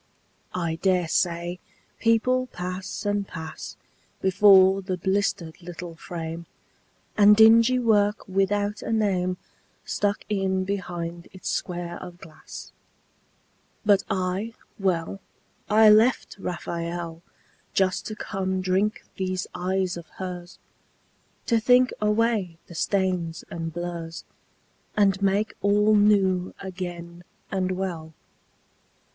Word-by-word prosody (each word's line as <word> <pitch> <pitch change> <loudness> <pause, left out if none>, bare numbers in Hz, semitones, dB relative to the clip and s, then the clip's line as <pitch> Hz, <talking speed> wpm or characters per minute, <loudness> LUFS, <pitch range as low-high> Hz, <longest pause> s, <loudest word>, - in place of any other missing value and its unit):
I 165 -2 -2
dare 185 -3 +2
say 175 +1 0 0.4
people 250 +3 +2
pass 185 -1 -5
and 205 -1 0
pass 160 -2 -8 0.4
Before 190 0 +6
the 185 -1 -3
blistered 190 -2 -1
little 175 -1 -8
frame, 165 0 -6 0.7
And 210 0 +7
dingy 230 +3 +7
work 215 -3 +2
without 205 +2 0
a - - -4
name 185 -5 +1 0.5
Stuck 205 0 -1
in 190 -2 0
behind 175 -3 -4
its 185 - -6
square 175 -1 -4
of 180 -1 -9
glass. 160 -3 -11 1.1
But 205 -2 +4
I, 195 +3 -2 0.2
well, 185 -1 -1 0.5
I 215 0 +7
left 225 +4 +3
Raphael 170 -2 -4 0.5
Just 190 -1 +1
to 215 - -5
come 190 -3 -2
drink 190 +3 0
these 185 -1 -2
eyes 185 0 -1
of 170 -2 -9
hers, 180 -1 -6 0.9
To 230 -2 +3
think 250 +3 +4
away 210 -5 +1
the - - -12
stains 180 -2 -1
and 165 -1 -4
blurs 170 -1 -5 0.7
And 200 -2 +3
make 200 +2 +1
all 210 +2 +4
new 195 -3 +3
again 175 -2 -7 0.3
and 185 -1 0
well. 170 -4 -4
190 Hz, 110 wpm, -25 LUFS, 175-205 Hz, 1.1 s, And